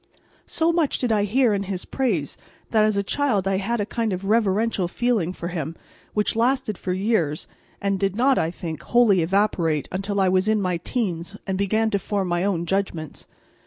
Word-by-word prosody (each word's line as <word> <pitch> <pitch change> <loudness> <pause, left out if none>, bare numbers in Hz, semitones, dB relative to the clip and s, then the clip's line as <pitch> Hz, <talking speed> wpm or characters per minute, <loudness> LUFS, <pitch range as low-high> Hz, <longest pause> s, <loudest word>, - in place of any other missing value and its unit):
So 330 +1 +1
much 330 -4 +1
did 245 -3 -1
I 205 -2 +2
hear 235 +2 +3
in 200 - 0
his 185 -2 -3
praise 210 - -1 0.4
that 220 -2 +4
as 215 -1 +2
a 200 - +1
child 210 -5 0
I 195 0 +1
had 230 +4 -1
a 205 - 0
kind 225 0 -2
of 185 +2 -4
reverential 210 -2 +2
feeling 215 -3 0
for 170 -2 -5
him, 165 -2 -4 0.4
which 210 +1 +1
lasted 235 -2 +1
for 180 - -4
years 185 -6 0 0.3
and 200 -1 -1
did 195 0 0
not, 260 +4 +3
I 160 - +1
think, 165 -2 -6
wholly 230 -7 +4
evaporate 165 -4 +1
until 195 +2 -2
I 190 - +3
was 185 +2 +2
in 215 0 +3
my 180 -3 0
teens 185 -2 -3
and 190 - -1
began 215 +3 +1
to 200 - +1
form 195 -2 -2
my 175 +1 0
own 185 -4 0
judgments. 175 -4 -3
200 Hz, 200 wpm, -23 LUFS, 180-225 Hz, 0.4 s, that